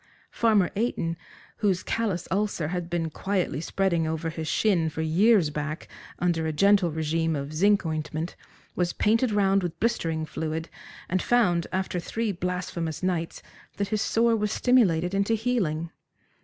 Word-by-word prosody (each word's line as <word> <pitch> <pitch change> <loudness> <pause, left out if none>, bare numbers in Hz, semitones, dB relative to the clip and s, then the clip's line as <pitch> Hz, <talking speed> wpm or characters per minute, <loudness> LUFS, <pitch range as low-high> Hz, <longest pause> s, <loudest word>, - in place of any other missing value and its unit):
Farmer 215 -6 +3
Eyton, 195 -7 -1 0.4
whose 190 -4 +1
callous 210 -7 -1
ulcer 195 -5 0
had 175 -1 -3
been 165 -2 -1
quietly 185 -5 -1
spreading 170 -2 0
over 160 +1 -2
his 160 -1 -5
shin 175 -4 +2
for 160 +1 -3
years 180 +1 +4
back 155 +2 -4 0.3
under 165 -2 0
a - - 0
gentle 195 +3 +4
regime 160 +1 0
of 140 +1 -4
zinc 200 +4 +3
ointment, 155 +1 -3 0.4
was 175 -1 0
painted 225 +3 +2
round 195 -1 +3
with 175 -3 -4
blistering 165 -9 0
fluid, 160 +1 -4 0.4
and 185 0 0
found, 180 -9 +2
after 185 -1 -1
three 225 +5 -2
blasphemous 180 -3 -3
nights, 175 -3 -2 0.3
that 200 -1 -1
his 215 0 0
sore 230 +1 +3
was 210 -2 -1
stimulated 185 -9 +3
into 200 +3 +2
healing. 190 -9 -1
175 Hz, 150 wpm, -26 LUFS, 160-205 Hz, 0.4 s, years